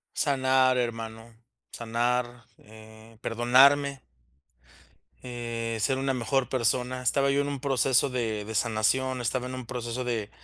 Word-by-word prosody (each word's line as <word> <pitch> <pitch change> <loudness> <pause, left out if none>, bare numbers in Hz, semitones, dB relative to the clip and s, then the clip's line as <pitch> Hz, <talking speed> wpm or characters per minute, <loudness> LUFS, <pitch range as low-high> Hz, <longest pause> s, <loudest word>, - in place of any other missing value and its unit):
Sanar 130 -2 +2
hermano, 115 -1 -4 0.4
sanar, 120 +1 -2
eh, 110 +1 -16
perdonarme 135 +4 +3 1.2
eh, 115 -2 -4
ser 130 +4 +1
una 135 0 -1
mejor 130 +1 -1
persona. 125 +1 0
Estaba 140 +2 +2
yo 140 - +2
en 145 - -3
un 140 -1 -4
proceso 135 0 +2
de 110 -5 -3
de 110 +1 -6
sanación, 125 +4 +1
estaba 125 +1 -2
en 130 - -6
un 130 - -7
proceso 120 0 -4
de 115 -4 -3
125 Hz, 130 wpm, -27 LUFS, 115-130 Hz, 1.2 s, perdonarme